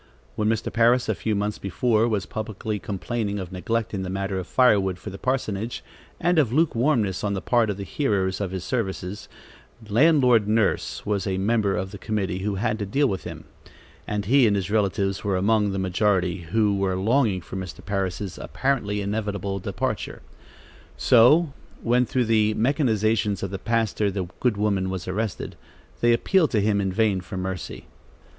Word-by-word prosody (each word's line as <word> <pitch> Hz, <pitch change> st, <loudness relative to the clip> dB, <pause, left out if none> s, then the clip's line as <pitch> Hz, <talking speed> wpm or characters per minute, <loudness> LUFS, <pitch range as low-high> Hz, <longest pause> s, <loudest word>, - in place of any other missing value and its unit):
When 105 Hz, 0 st, 0 dB
Mr. 110 Hz, -1 st, -1 dB
Parris, 120 Hz, +2 st, +3 dB
a -, -, +3 dB
few 110 Hz, -2 st, -2 dB
months 105 Hz, +1 st, -2 dB
before, 110 Hz, +4 st, +1 dB
was 105 Hz, -4 st, -1 dB
publicly 110 Hz, -1 st, -4 dB
complaining 105 Hz, +2 st, -3 dB
of 95 Hz, -2 st, -6 dB
neglect 110 Hz, +5 st, -2 dB
in 95 Hz, -, -2 dB
the 95 Hz, -, -4 dB
matter 95 Hz, 0 st, -2 dB
of 95 Hz, -, -6 dB
firewood 100 Hz, -8 st, +3 dB
for 105 Hz, -, -8 dB
the 95 Hz, -, -9 dB
parsonage, 115 Hz, -4 st, -2 dB, 0.4 s
and 175 Hz, -1 st, +3 dB
of 130 Hz, -7 st, +2 dB
lukewarmness 120 Hz, -, +1 dB
on 100 Hz, -1 st, 0 dB
the -, -, -2 dB
part 115 Hz, +3 st, +2 dB
of 100 Hz, -, -2 dB
the 100 Hz, -, -5 dB
hearers 100 Hz, -5 st, -1 dB
of 100 Hz, -, -1 dB
his 95 Hz, -1 st, -5 dB
services, 95 Hz, -3 st, -3 dB, 0.6 s
"Landlord 125 Hz, -2 st, +4 dB
Nurse" 110 Hz, 0 st, 0 dB
was 100 Hz, -2 st, -1 dB
a 95 Hz, -1 st, -1 dB
member 100 Hz, 0 st, +1 dB
of 95 Hz, 0 st, -3 dB
the -, -, -9 dB
committee 100 Hz, -4 st, -2 dB
who 100 Hz, +1 st, -2 dB
had 110 Hz, +2 st, -1 dB
to 105 Hz, -, -2 dB
deal 140 Hz, +8 st, +2 dB
with 95 Hz, -5 st, -3 dB
him, -, -, -7 dB, 0.6 s
and 105 Hz, -1 st, -2 dB
he 130 Hz, +3 st, +5 dB
and 105 Hz, -, +2 dB
his 100 Hz, 0 st, -2 dB
relatives 100 Hz, -2 st, 0 dB
were 100 Hz, -2 st, 0 dB
among 105 Hz, +2 st, +2 dB
the 95 Hz, -, -3 dB
majority, 95 Hz, -2 st, 0 dB
who 105 Hz, 0 st, +2 dB
were 95 Hz, -1 st, 0 dB
longing 110 Hz, 0 st, +2 dB
for 85 Hz, -, -9 dB
Mr. 95 Hz, -1 st, -7 dB
Parris' 95 Hz, -1 st, -3 dB
apparently 105 Hz, -7 st, -1 dB
inevitable 100 Hz, -1 st, -2 dB
departure. 95 Hz, -, -3 dB, 0.7 s
So 135 Hz, +6 st, +5 dB, 0.3 s
when, 120 Hz, +1 st, +2 dB
through 125 Hz, -2 st, +1 dB
the 110 Hz, -1 st, +2 dB
machinations 110 Hz, -, +1 dB
of 95 Hz, -, -3 dB
the 95 Hz, -, -4 dB
pastor, 110 Hz, -2 st, 0 dB
the 95 Hz, -1 st, -3 dB
good 120 Hz, -5 st, +1 dB
woman 100 Hz, -3 st, 0 dB
was 95 Hz, -1 st, -5 dB
arrested, 105 Hz, +2 st, -3 dB, 0.4 s
they 120 Hz, -, +4 dB
appealed 160 Hz, +8 st, +3 dB
to 110 Hz, -, +3 dB
him 100 Hz, 0 st, +2 dB
in 95 Hz, -1 st, -1 dB
vain 100 Hz, -1 st, +1 dB
for 95 Hz, +1 st, -7 dB
mercy. 95 Hz, -1 st, -5 dB
105 Hz, 180 wpm, -24 LUFS, 95-115 Hz, 0.7 s, he